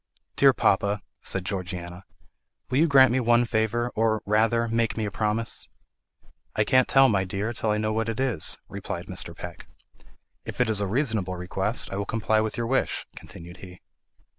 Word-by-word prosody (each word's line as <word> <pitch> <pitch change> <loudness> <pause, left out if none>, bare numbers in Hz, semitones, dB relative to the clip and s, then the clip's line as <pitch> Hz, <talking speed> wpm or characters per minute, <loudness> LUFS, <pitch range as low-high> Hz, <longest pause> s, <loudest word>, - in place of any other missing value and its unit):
"Dear 135 -1 +6
papa," 100 -4 +1 0.2
said 95 -1 -3
Georgiana, 90 -2 -5 0.7
"will 130 - +2
you 165 - +5
grant 135 -4 +6
me 130 - +2
one 120 0 +3
favour; 115 +1 0
or, 110 0 +1
rather, 115 +3 +2
make 115 0 0
me 110 - -1
a 105 - -4
promise?" 110 +2 -1 0.9
"I 105 - +3
can't 130 +3 +3
tell, 135 0 +6
my 100 -5 +2
dear, 100 +5 -3
till 110 - -2
I 105 - +2
know 110 0 -1
what 110 +1 -1
it 115 - -4
is," 125 -11 -1
replied - - -6
Mr. - - -6
Peck. - - -9 0.8
"If - - -8
it 125 -3 +2
is 105 -2 +2
a 100 - 0
reasonable 110 -5 0
request, 95 +5 -2
I 95 - -3
will 100 - -2
comply 110 0 +1
with 110 0 -3
your 120 - -1
wish," 130 +3 0
continued 85 -1 -11
he. 90 -1 -12
110 Hz, 185 wpm, -25 LUFS, 100-120 Hz, 0.9 s, Dear